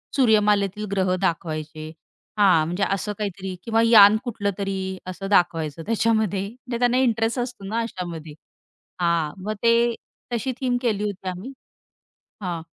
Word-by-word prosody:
सूर्यमालेतील 210 -4 +3
ग्रह 190 -2 +1
दाखवायचे. 155 -2 -3 0.5
हां, 180 -6 +5
म्हणजे 180 +4 -1
असं 200 +2 -2
काहीतरी 195 -2 -4
किंवा 225 -1 +2
यान 215 -2 +8
कुठलं 210 -5 -2
तरी 190 -1 -3
असं 185 +1 -5
दाखवायचं 165 -4 +1
त्याच्यामध्ये 220 -3 +1
म्हणजे 245 +1 -7
त्यांना 245 0 +3
इंटरेस्ट 230 -1 +1
असतो 240 -4 -5
ना, 220 +3 -1
अशामध्ये. 170 -8 -6 0.7
हां 170 -3 +1
मग 215 +2 -2
ते 235 0 +4 0.4
तशी 250 +3 -1
थीम 250 -2 +1
केली 215 -5 0
होती 195 -2 -5
आम्ही. 185 +9 -7 0.9
हां. 175 -4 -3
200 Hz, 135 wpm, -23 LUFS, 180-230 Hz, 0.9 s, यान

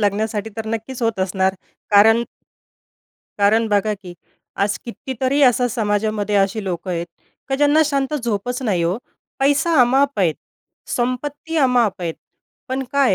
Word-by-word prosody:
लागण्यासाठी 210 +1 -1
तर 220 - -4
नक्कीच 225 +3 -4
होत 230 -3 0
असणार 190 0 +1 0.4
कारण 225 +3 +6 1.2
कारण 215 +3 +3
बघा, 210 0 +1
की 185 -3 -11 0.4
आज 200 0 0
कितीतरी 260 +2 -2
असा 250 -1 +4
समाजामध्ये 210 -2 -1
असी 195 +2 +1
लोकं 180 0 -4
आहेत, 170 -1 -2 0.4
की 270 - 0
ज्यांना 295 +2 +4
शांत 280 -1 -1
झोपच 245 -1 -2
नाही 190 -8 0
हो. 175 +4 0 0.4
पैसा 290 +5 +2
अमाआप 270 +2 +3
आहे, 165 -4 +3 0.5
संपत्ती 285 +6 -3
अमाआप 245 -8 +2
आहे, 165 -2 -2 0.6
पण 265 +1 -2
काय 275 -7 +3
225 Hz, 135 wpm, -20 LUFS, 200-265 Hz, 1.2 s, कारण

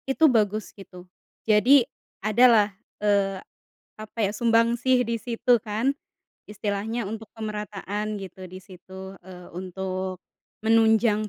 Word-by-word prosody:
Itu 295 +4 +3
bagus 215 -1 0
gitu. 180 -2 -13 0.4
Jadi 235 +5 +5 0.4
adalah, 215 -2 +5 0.3
eee, 200 -2 +2 0.6
apa, 215 +1 -11
ya, 195 - -1
sumbangsih 235 +3 +2
di 230 +1 -1
situ, 240 +1 +2
kan. 220 +6 -1 0.6
Istilahnya 210 +2 -3
untuk 220 +1 -7
pemerataan 210 -1 -5
gitu 190 -1 -9
di 185 +1 -10
situ, 190 +1 -11
eee, 180 -1 -11
untuk 185 0 -4 0.4
menunjang 220 -1 +3
210 Hz, 110 wpm, -25 LUFS, 195-230 Hz, 0.6 s, Jadi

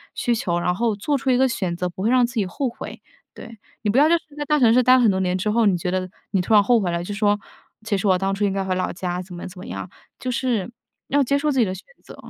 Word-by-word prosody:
需 240 - 0
求， 180 -6 -1
然 180 - +1
后 225 +2 0
做 280 +8 -1
出 265 - -2
一 255 - +4
个 265 0 +4
选 185 -6 -2
择， 180 +1 -2
不 180 - -9
会 225 - +2
让 255 -1 +4
自 235 - -7
己 210 - +1
后 250 +9 -2
悔。 235 - -9 0.3
对。 230 -1 -11 0.2
你 210 - -1
不 225 - +1
要 295 - +6
就 335 - +4
是 - - -14
在 295 - -3
大 300 0 +2
城 230 -3 +5
市 255 - +5
待 255 - +6
了 260 - +4
很 230 - +5
多 190 - -1
年 185 0 0
之 210 +3 -1
后， 230 +1 +2
你 195 -3 +4
觉 175 +1 -3
得 185 0 -1 0.2
你 195 - +1
突 180 - -1
然 205 -1 +7
后 235 +3 +4
悔 185 -4 -1
了， 170 0 -2
就 205 - -5
说： 205 0 +2 0.5
“其 215 -2 -1
实 205 - -1
我 185 -1 +4
当 195 +1 -1
初 200 +1 0
应 195 - 0
该 195 0 -1
回 185 -1 -1
老 185 0 -1
家。” 180 -1 -3
怎 180 -1 -10
么 175 - -7
怎 180 0 -11
么 - - -9
样。 - - -6 0.3
就 255 - -4
是， 240 -4 -1 0.4
要 285 +1 +2
接 280 +3 +1
受 300 +1 0
自 265 - 0
己 230 - +4
的 185 - -3
选 190 - -11 0.2
择。 - - -12
205 Hz, 340 characters per minute, -22 LUFS, 185-245 Hz, 0.5 s, 然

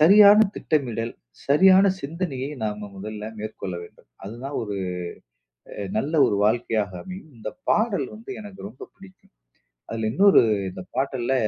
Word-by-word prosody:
சரியான 200 +5 +8 0.2
திட்டமிடல், 120 -7 -1 0.4
சரியான 190 +7 +6
சிந்தனையை 145 -4 -4
நாம 105 -1 -4
முதல்ல 105 +2 -6 0.2
மேற்கொள்ள 105 -4 -5
வேண்டும். 85 - -16 0.2
அதுதான் 120 +8 -6
ஒரு 105 -2 -4 1.0
அ - - -11 0.2
நல்ல 150 - -2
ஒரு - - 0
வாழ்க்கையாக 110 -2 +1
அமையும். 185 -3 -9
இந்த 110 - -5 0.2
பாடல் 215 -2 +2
வந்து 215 -2 -10
எனக்கு 205 -2 -10
ரொம்ப 110 +5 -11
பிடிக்கும். 195 -1 -17 0.6
அதுல 110 -1 -2
இன்னொரு 200 +4 +6 0.3
இந்த 95 - -8
பாட்டல்ல 130 -1 0
135 Hz, 130 wpm, -24 LUFS, -, 1.0 s, சரியான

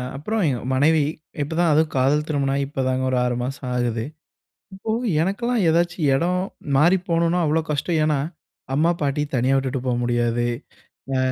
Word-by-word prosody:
அப்புறம் 210 +10 -2
எங்க 125 -4 0
மனைவி. 150 +3 +3 0.4
இப்போதான், 165 +3 +1
அதுவும் 155 +1 +2
காதல் 140 +4 +2
திருமணம் 140 -3 0
ஆகி 140 0 0
இப்போதாங்க 130 -2 -1
ஒரு 130 - +1
6 125 -1 0
மாசோ 135 +3 -4
ஆகுது. 120 -2 -1 0.7
இப்போ 205 +3 -5 0.3
எனக்கெல்லாம் 230 +5 0
ஏதாச்சும் 170 -2 +1
எடம் 180 +6 +1 0.3
மாறி 170 +7 +5
போணும்னா, 170 +1 +2
அவ்ளோ 155 +2 +2
கஷ்டம். 155 +3 0
ஏன்னா, 150 -2 +1 0.6
அம்மா 160 +4 +3
பாட்டி 145 +1 0
தனியா 130 +2 +2
விட்டுட்டு 135 -1 -1
போ 125 - +1
முடியாது. 120 0 +1 0.7
ஆ - - +1
145 Hz, 155 wpm, -22 LUFS, 130-170 Hz, 0.7 s, மாறி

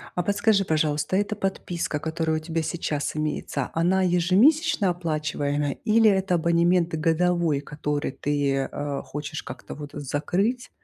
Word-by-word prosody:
А 180 - 0
подскажи, 205 0 +2
пожалуйста, 155 +1 0
эта 205 +2 0
подписка, 175 -5 -2
которая 160 0 -1
у - - -2
тебя 165 +1 -2
сейчас 150 -3 -2
имеется, 150 -3 -2
она 180 +3 +2
ежемесячно 190 - +3
оплачиваемая 150 -4 -1
или 220 0 +5
это 190 -2 +2
абонемент 170 +1 +2
годовой, 165 -2 +1
который 145 -1 -3
ты, 140 -2 0
э, 145 -1 -4
хочешь 150 +2 -5
как-то - - -9
вот 145 -1 -8
закрыть? 175 - -1
165 Hz, 135 wpm, -25 LUFS, 150-185 Hz, -, или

